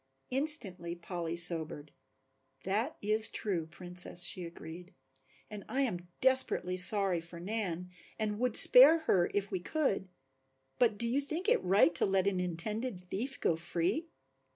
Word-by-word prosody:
Instantly 200 - 0
Polly 170 -1 -6
sobered. 160 -4 0 0.7
"That 220 +11 -2
is 215 +1 0
true, 180 -7 -3
Princess," 175 +1 0
she 180 - 0
agreed, 170 +1 -11 0.5
"and 210 -2 -9
I 260 +5 -1
am 180 -10 -3
desperately 260 -8 +3
sorry 185 -1 +4
for 170 +1 -11
Nan 180 -2 -5 0.3
and 210 -1 -3
would 250 +1 0
spare 410 -10 +7
her 185 - +1
if 200 -1 -2
we 190 - -3
could, 195 - -2 0.7
but 230 -4 +2
do 235 - +1
you 260 +5 -1
think 315 +7 -4
it 480 - +2
right 180 -2 +3
to 170 - +1
let 195 -1 0
an 195 -2 -1
intended 185 +6 -3
thief 205 +10 -6
go 165 - 0
free? 175 - -2
190 Hz, 150 wpm, -31 LUFS, 175-235 Hz, 0.7 s, spare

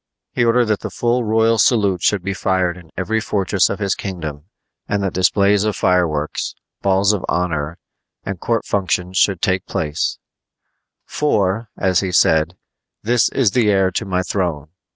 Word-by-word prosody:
He - - +1
ordered 120 +1 +3
that 110 -2 0
the - - -5
full 120 +1 0
royal 110 +1 +2
salute 100 -8 +3
should 100 -3 +1
be 100 +1 -2
fired 95 -2 0
in 85 -3 -14
every 110 +4 0
fortress 100 -2 +1
of 100 - -3
his 100 -2 0
kingdom 80 -6 -6 0.4
and 100 -1 0
that 95 - -2
displays 100 +2 +3
of 110 -1 -1
fireworks, 85 -5 0 0.3
balls 100 +1 +3
of 100 - -3
honor, 85 -3 -1 0.5
and 95 -2 -4
court 115 +3 -1
functions 95 -2 -1
should 95 -4 +2
take 95 -3 0
place; 75 0 -2 0.9
"for," 110 -6 0
as 95 -2 +2
he 95 -2 -2
said, 80 -1 +3 0.5
"this 120 +1 +2
is 125 -7 +1
the 115 -2 +2
heir 95 -2 +3
to 95 - -2
my 95 -1 -1
throne." 85 -6 -2
95 Hz, 165 wpm, -19 LUFS, 90-105 Hz, 0.9 s, ordered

